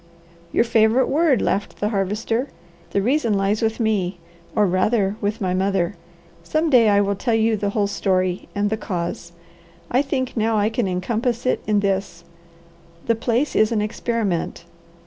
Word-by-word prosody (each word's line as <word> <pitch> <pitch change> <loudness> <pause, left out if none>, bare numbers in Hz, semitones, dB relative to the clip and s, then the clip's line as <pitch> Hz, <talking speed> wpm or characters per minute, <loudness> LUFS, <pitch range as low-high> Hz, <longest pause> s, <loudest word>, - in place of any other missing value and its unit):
"Your - - +3
favourite 230 +2 +3
word," 290 -5 +2
laughed 200 +1 -1
the 210 - 0
Harvester. 215 +5 -1 0.4
"The 200 - 0
reason 240 -3 +1
lies 195 +2 0
with 225 +1 0
me, 200 -5 0 0.4
or 210 - +4
rather 195 +2 +1
with 210 +2 -1
my 185 -4 -1
mother. 190 -1 0 0.5
Some 310 - 0
day 235 -4 +6
I 200 0 +4
will 200 0 +1
tell 225 +4 0
you 225 0 +2
the 200 -1 -1
whole 205 0 0
story, 185 -2 -1
and 205 +1 0
the 220 - 0
cause. 170 -4 -4 0.6
I 255 - +4
think 270 -2 -2
now 220 -1 +1
I 210 +1 +2
can 225 -2 0
encompass 230 +7 -1
it 255 - +1
in 210 -1 +2
this. 190 -3 -2 0.8
The 230 - +3
place 235 +5 -1
is 215 +1 +3
an 220 -2 +1
experiment. 210 -6 -2
210 Hz, 165 wpm, -22 LUFS, 195-230 Hz, 0.8 s, day